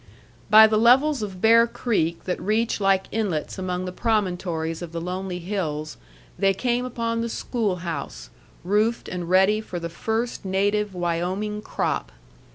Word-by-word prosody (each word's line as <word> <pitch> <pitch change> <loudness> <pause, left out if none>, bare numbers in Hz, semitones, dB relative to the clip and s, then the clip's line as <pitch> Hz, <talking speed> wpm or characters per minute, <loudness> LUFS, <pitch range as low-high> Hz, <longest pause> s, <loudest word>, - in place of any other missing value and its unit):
By 215 +1 +9
the 215 -1 +2
levels 265 +4 +4
of 195 -3 -6
Bear 230 +2 +6
Creek 170 -9 -1
that 180 - -3
reach 220 +3 0
like 195 -1 +3
inlets 195 -6 -2
among 180 -1 -3
the 180 - -4
promontories 180 -7 -1
of 170 -1 -7
the 170 - -3
lonely 180 +1 -4
hills, 165 -5 -3 0.4
they 195 -1 +3
came 245 +3 0
upon 230 -2 -2
the 235 - -2
schoolhouse, 180 - -3 0.3
roofed 210 +5 +1
and 175 -2 -5
ready 190 +4 +4
for 180 -5 -6
the 170 0 -5
first 225 +7 -3
native 200 +1 0
Wyoming 180 +5 -2
crop. - - -2
195 Hz, 150 wpm, -24 LUFS, 180-220 Hz, 0.4 s, By